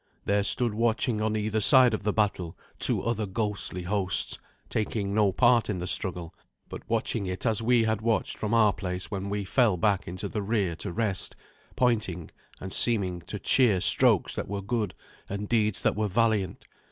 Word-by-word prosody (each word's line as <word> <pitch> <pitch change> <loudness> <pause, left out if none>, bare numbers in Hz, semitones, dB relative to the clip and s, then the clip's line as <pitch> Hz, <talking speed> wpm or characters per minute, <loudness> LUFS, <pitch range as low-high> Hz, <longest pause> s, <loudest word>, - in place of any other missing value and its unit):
There 100 0 +1
stood 120 +2 +3
watching 115 0 0
on 110 0 -1
either 110 0 -1
side 125 +1 +6
of 110 - -2
the 105 0 -1
battle 100 -5 -2 0.2
two - - +1
other 110 -2 -2
ghostly 100 -2 -3
hosts, 95 0 -1 0.3
taking 105 -2 -3
no 105 -2 +2
part 120 +3 +3
in 100 - -2
the 90 - -5
struggle, 90 -3 -1 0.4
but - - -8
watching 115 -2 -1
it 90 +5 -5
as 115 -2 +1
we 120 0 +3
had 110 -1 -1
watched 110 -3 -1
from 105 - -4
our 110 -3 +4
place 90 0 -5
when 100 -1 -4
we 100 0 -3
fell 105 -1 +1
back 100 -1 0
into 90 +1 -5
the 105 - -4
rear 100 -4 -1
to 90 +2 -5
rest, 100 -1 -2 0.4
pointing 110 -9 -1 0.3
and 95 0 -6
seeming 95 -7 +1
to 105 - -5
cheer 110 -2 +3
strokes - - +4
that - - -5
were 100 0 -5
good 105 -2 -2 0.3
and 100 +1 -5
deeds 110 -3 +1
that - - +1
were 105 0 -1
valiant. 105 -2 -1
105 Hz, 185 wpm, -27 LUFS, 95-110 Hz, 0.4 s, side